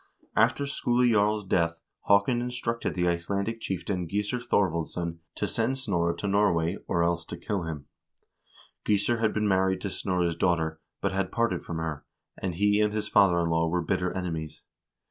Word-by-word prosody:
After 140 Hz, -, +3 dB
Skule 125 Hz, -3 st, +1 dB
Jarl's 105 Hz, -2 st, +2 dB
death 85 Hz, -3 st, 0 dB, 0.2 s
Haakon 100 Hz, +5 st, +4 dB
instructed 120 Hz, -1 st, -2 dB
the 90 Hz, -1 st, +1 dB
Icelandic 100 Hz, +6 st, -1 dB
chieftain 95 Hz, -1 st, -2 dB
Gissur 105 Hz, +6 st, -1 dB
Thorvaldsson 85 Hz, -6 st, -1 dB, 0.2 s
to -, -, -1 dB
send 115 Hz, +4 st, 0 dB
Snorre 85 Hz, -9 st, 0 dB
to 100 Hz, -, -3 dB
Nor 100 Hz, 0 st, +3 dB
way, 85 Hz, +4 st, -1 dB
or 85 Hz, -, +1 dB
else 85 Hz, 0 st, +1 dB
to -, -, -7 dB
kill 100 Hz, -5 st, -3 dB
him. 75 Hz, -3 st, -5 dB, 1.0 s
Gissur 105 Hz, +3 st, +1 dB
had 110 Hz, -1 st, +2 dB
been 105 Hz, -1 st, 0 dB
married 95 Hz, -1 st, +2 dB
to 100 Hz, -, -2 dB
Snorre's 90 Hz, -3 st, 0 dB
daugh 85 Hz, +1 st, +2 dB
ter, 80 Hz, -1 st, -3 dB, 0.2 s
but -, -, 0 dB
had 95 Hz, -1 st, -1 dB
parted 115 Hz, -1 st, 0 dB
from 80 Hz, -, -5 dB
her, 80 Hz, -2 st, -3 dB, 0.3 s
and 90 Hz, -3 st, -3 dB
he 105 Hz, +3 st, +3 dB
and 105 Hz, 0 st, +2 dB
his 105 Hz, -1 st, -1 dB
father 90 Hz, -3 st, +5 dB
in 85 Hz, -1 st, 0 dB
law 80 Hz, 0 st, +2 dB
were 90 Hz, +1 st, 0 dB
bitter 90 Hz, +2 st, 0 dB
enemies. 80 Hz, -4 st, -4 dB
95 Hz, 180 wpm, -27 LUFS, 85-105 Hz, 1.0 s, father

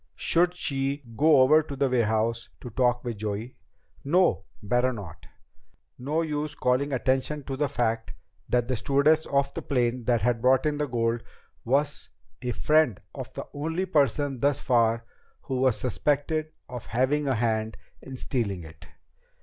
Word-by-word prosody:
Should 175 Hz, +1 st, +2 dB
she 140 Hz, -3 st, -2 dB
go 150 Hz, +1 st, +5 dB
over 150 Hz, +4 st, +6 dB
to 145 Hz, -2 st, -7 dB
the 135 Hz, 0 st, +1 dB
warehouse 115 Hz, -1 st, 0 dB
to 125 Hz, -, -8 dB
talk 125 Hz, 0 st, +1 dB
with 120 Hz, -3 st, -4 dB
Joey? 110 Hz, +3 st, -4 dB, 0.5 s
No, 170 Hz, -, +2 dB, 0.2 s
better 125 Hz, +5 st, +2 dB
not. 100 Hz, -10 st, -9 dB, 0.7 s
No 150 Hz, +6 st, 0 dB
use 150 Hz, -1 st, -3 dB
calling 130 Hz, +3 st, +1 dB
attention 135 Hz, +3 st, 0 dB
to 135 Hz, 0 st, -4 dB
the 145 Hz, +1 st, 0 dB
fact 115 Hz, -, -1 dB, 0.4 s
that 120 Hz, -1 st, +1 dB
the 130 Hz, -, 0 dB
stewardess 140 Hz, +7 st, +2 dB
of 140 Hz, 0 st, +1 dB
the -, -, -4 dB
plane 125 Hz, -3 st, 0 dB
that 120 Hz, -4 st, +2 dB
had 120 Hz, -1 st, +1 dB
brought 130 Hz, +3 st, +4 dB
in 150 Hz, -1 st, 0 dB
the 150 Hz, -, 0 dB
gold 115 Hz, -1 st, 0 dB, 0.4 s
was 145 Hz, +4 st, 0 dB, 0.3 s
a 125 Hz, -, -3 dB
friend 150 Hz, -4 st, +2 dB
of -, -, -7 dB
the -, -, -5 dB
only 160 Hz, +6 st, -2 dB
person 145 Hz, -5 st, +1 dB
thus 140 Hz, +2 st, +2 dB
far 115 Hz, -2 st, +2 dB, 0.4 s
who 130 Hz, -, -3 dB
was 130 Hz, -4 st, +3 dB
suspected 150 Hz, +4 st, 0 dB, 0.2 s
of 125 Hz, -2 st, -8 dB
having 135 Hz, +5 st, +1 dB
a 135 Hz, -, +2 dB
hand 110 Hz, -1 st, -1 dB, 0.2 s
in 135 Hz, -1 st, -8 dB
stealing 100 Hz, -10 st, -2 dB
it. 80 Hz, 0 st, -13 dB
130 Hz, 160 wpm, -27 LUFS, 115-145 Hz, 0.7 s, over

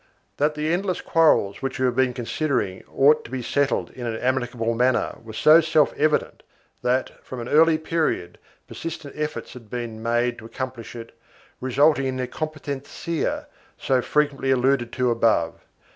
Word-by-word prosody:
1 -, -, -35 dB, 0.3 s
That 150 Hz, +1 st, +1 dB
the 155 Hz, +2 st, 0 dB
endless 185 Hz, 0 st, -1 dB
quarrels 155 Hz, -11 st, +3 dB
which 135 Hz, 0 st, -3 dB
we 130 Hz, -, +1 dB
have 125 Hz, -, +1 dB
been 130 Hz, 0 st, +3 dB
considering 120 Hz, -6 st, -2 dB
ought 150 Hz, +3 st, +4 dB
to -, -, -11 dB
be 130 Hz, -1 st, -4 dB
settled 140 Hz, +3 st, 0 dB
in 120 Hz, -2 st, -6 dB
an 115 Hz, -, -2 dB
amicable 120 Hz, -2 st, -1 dB
manner 125 Hz, +2 st, +1 dB
was 110 Hz, -1 st, -9 dB
so 155 Hz, +2 st, +7 dB
self 155 Hz, -2 st, +3 dB
evident 150 Hz, +1 st, 0 dB, 0.4 s
that, 125 Hz, +1 st, -1 dB
from 130 Hz, -, -7 dB
an 120 Hz, -, -5 dB
early 160 Hz, +2 st, +5 dB
period, 155 Hz, -, -2 dB, 0.3 s
persistent 160 Hz, -3 st, -7 dB
efforts 150 Hz, 0 st, -4 dB
had 115 Hz, -4 st, -13 dB
been 115 Hz, -2 st, -5 dB
made 120 Hz, +1 st, 0 dB
to 110 Hz, -, -12 dB
accomplish 130 Hz, 0 st, -6 dB
it, 115 Hz, -1 st, -9 dB, 0.4 s
resulting 135 Hz, +2 st, +3 dB
in 130 Hz, 0 st, -2 dB
the 130 Hz, -1 st, -2 dB
"competencia" 155 Hz, +2 st, -4 dB, 0.3 s
so 130 Hz, -1 st, +1 dB
frequently 145 Hz, -1 st, 0 dB
alluded 130 Hz, -2 st, +2 dB
to 125 Hz, -1 st, +1 dB
above. 115 Hz, -8 st, +1 dB
130 Hz, 165 wpm, -24 LUFS, 120-150 Hz, 0.4 s, so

